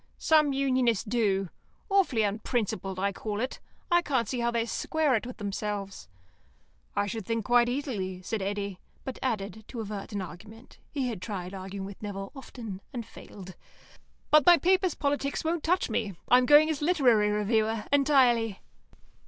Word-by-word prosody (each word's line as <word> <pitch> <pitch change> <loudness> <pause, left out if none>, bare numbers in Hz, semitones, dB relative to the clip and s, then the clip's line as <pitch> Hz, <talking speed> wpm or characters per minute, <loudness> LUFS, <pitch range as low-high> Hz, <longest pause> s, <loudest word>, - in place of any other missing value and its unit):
"Some 305 -2 +4
Unionists 260 -5 +1
do. 205 -5 0 0.4
Awfully 375 - +2
unprincipled, 205 -2 -2
I 200 +1 0
call 210 +1 -4
it. 255 +3 -3 0.3
I 345 0 +5
can't 260 -9 0
see 250 +2 -2
how 235 0 +1
they 235 -1 0
square 310 +4 0
it 235 +1 0
with 250 - -8
themselves." 200 - -4 0.9
"I 205 - +1
should 220 +2 -4
think 230 +1 -2
quite 240 0 +4
easily," 220 -9 -3
said 215 +3 -3
Eddy; 200 -1 -3 0.2
but 265 - -6
added, 215 -4 -3
to 240 - -7
avert 210 -2 -5
an 200 -2 -2
argument 215 +7 -12
(he 270 -4 -2
had 220 -7 -4
tried 185 -3 -5
arguing 190 0 -6
with 195 0 -10
Nevill 195 -2 -5
often, 225 -7 -8
and 235 -3 -5
failed), 190 -4 -11 0.8
"But 305 -1 +7
my 345 +4 +8
paper's 370 +2 +2
politics 280 -1 -1
won't 330 0 0
touch 360 +3 +2
me. 210 -4 -2 0.2
I'm 250 0 +5
going 295 +2 +7
as 300 - -4
literary 255 -11 +4
reviewer, 215 +1 +1
entirely." 250 -7 +3
225 Hz, 160 wpm, -28 LUFS, 200-270 Hz, 0.9 s, my